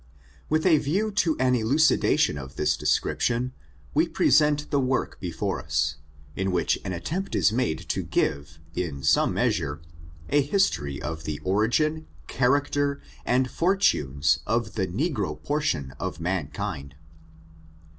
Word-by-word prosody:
With 155 +1 +1
a 160 -5 +5
view 195 +11 0
to 180 -6 +1
an 130 0 +2
elucidation 125 - +3
of 65 -2 -8
this - - +1
description, 125 +2 0 0.4
wo - - +3
present 150 +1 +3
the 140 - +3
work 130 0 -1
before - - -3
us, 75 +1 -1 0.4
in 95 0 -1
which 90 -2 +1
an 95 - -4
attempt 165 - -3
is - - +4
made 120 -9 0
to - - 0
give, 70 +1 -1 0.2
in 75 -7 -4
some - - +3
measure, 90 - 0 0.5
a 145 - +4
history 80 - 0
of 80 +1 -5
the 75 -1 -3
origin^ 120 +11 +1 0.2
character, 140 +2 +1 0.3
and 125 +1 +3
fortuiies, 115 - +2
of 115 +1 0
the 95 -4 -1
negro 100 - -2
portion 85 - -1
of 85 -3 -4
mankind. 75 -5 -3
115 Hz, 135 wpm, -26 LUFS, -, 0.5 s, a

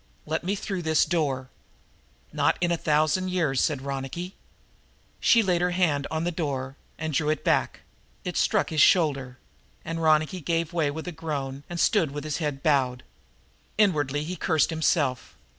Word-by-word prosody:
Let 160 +2 -2
me 195 +3 -1
through 195 -2 -4
this 160 -2 +3
door!" 140 -6 -1 0.8
"Not - - +2
in 175 -1 +1
a - - +3
thousand 155 +4 +1
years," 160 -8 +1
said 140 -4 0
Ronicky. 140 +7 -5 0.9
She 230 -2 +5
laid 180 -3 +1
her 180 - +2
hand 145 -6 +1
on 160 0 -2
the 175 - 0
door 140 -5 -3 0.2
and 160 -1 -3
drew 150 +2 +1
it 155 - -1
back - - +1 0.4
it - - -3
struck - - +1
his 155 -2 +2
shoulder 135 -8 +3 0.5
and 165 +1 -3
Ronicky 155 +3 +2
gave 165 +2 -1
way 160 -4 +1
with 160 +4 -6
a - - -3
groan 140 -4 -4
and 175 -1 -5
stood 170 -3 +3
with 145 +1 -6
his 155 -2 -3
head 145 -4 -3
bowed. 130 -4 +1 0.7
Inwardly 150 -9 +2
he 175 +4 -4
cursed 160 -1 +1
himself. 150 - 0
155 Hz, 170 wpm, -26 LUFS, 140-170 Hz, 0.9 s, She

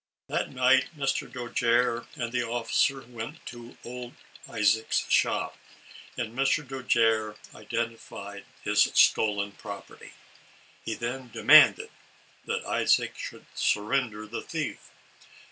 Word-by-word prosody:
That - - -2
night 130 0 +3
Mr. 135 -1 -1
Dojere 120 -1 0
and 120 -1 -4
the 125 0 0
officer 120 +3 0
went 120 +5 -8
to 120 0 -10
old 125 0 -8 0.3
Isaac's 110 0 +1
shop, - - +1 0.6
and 115 -1 -4
Mr. 135 +2 +1
Dojere 115 -5 +1 0.2
identified 110 -3 -5 0.2
his - - +3
stolen 100 -2 +3
property. 100 0 -10 0.7
He 110 - -3
then 125 +2 -5
demanded 130 +7 +6 0.5
that - - -3
Isaac - - +2
'should - - -8
surrender 110 0 0
the 110 +2 -6
thief. - - -5
120 Hz, 110 wpm, -27 LUFS, 110-125 Hz, 0.7 s, demanded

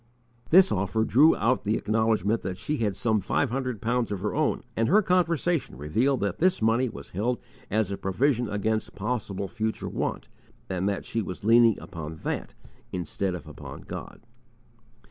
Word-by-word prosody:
This 190 +3 +7
offer 100 +3 +1
drew 145 +8 +5
out 120 +4 +1
the 110 +1 +1
acknowledgment 110 -1 +1
that 95 -1 -4
she 150 +7 -2
had 105 -5 0
some 110 0 +1
five 115 +6 0
hundred 125 -4 -3
pounds 120 0 0
of 100 -3 -3
her 105 - -1
own; 155 0 0
and 115 0 +1
her 210 +5 +5
conversation 175 - +1
revealed 115 - +1
that 100 -2 -1
this 185 +2 +3
money 115 +3 +2
was - - -10
held 120 +7 0 0.3
as 105 -1 +1
a 100 - -2
provision 120 +4 +1
against 110 +1 -1
possible 100 -3 -3
future 110 +1 -3
want, - - -3 0.4
and 95 +1 -1
that 100 - -3
she 115 - -1
was 90 -2 -6
leaning 115 0 +5
upon 80 -4 -7
that - - -3 0.4
instead 90 +1 -2
of 90 - -9
upon - - -9
God. - - -8
110 Hz, 170 wpm, -27 LUFS, 100-125 Hz, 0.4 s, This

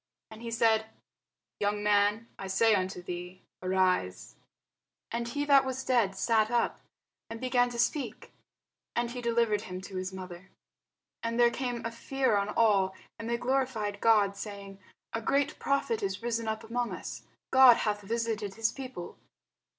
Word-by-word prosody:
And 220 +1 -11
he 235 - -5
said, 225 -1 +2 0.7
Young 205 0 0
man, 210 +2 +3
I 195 - -5
say 215 +4 +4
unto 185 -2 -1
thee, 180 +1 -7 0.2
Arise. 185 - 0 0.8
And 235 0 -2
he 285 +4 -2
that 280 -2 +6
was 260 0 -3
dead 230 -7 +2
sat 220 +1 +2
up, 240 -1 0 0.5
and 225 0 -6
began 245 -1 +2
to 240 - -7
speak. 265 +4 -1 0.6
And 235 0 0
he 245 0 -5
delivered 230 -3 +1
him 185 -4 -6
to 190 0 -7
his 185 +1 -3
mother. 185 0 -9 0.7
And 230 +1 -2
there 240 0 +6
came 245 -2 -3
a 230 - -2
fear 265 0 0
on 200 0 0
all: 200 -4 +3 0.2
and 230 - -5
they 235 - +1
glorified 245 -6 -1
God, 210 -3 +4
saying, 200 -1 -8 0.3
A 225 - -2
great 280 +5 0
prophet 275 -5 0
is 195 +2 -3
risen 230 -1 -1
up 220 0 -2
among 240 +1 -2
us; - - -7 0.3
God 260 -3 +8
hath 210 -1 -1
visited 220 -2 -2
his 225 -1 +1
people. 255 -10 -8
225 Hz, 160 wpm, -30 LUFS, 200-240 Hz, 0.8 s, God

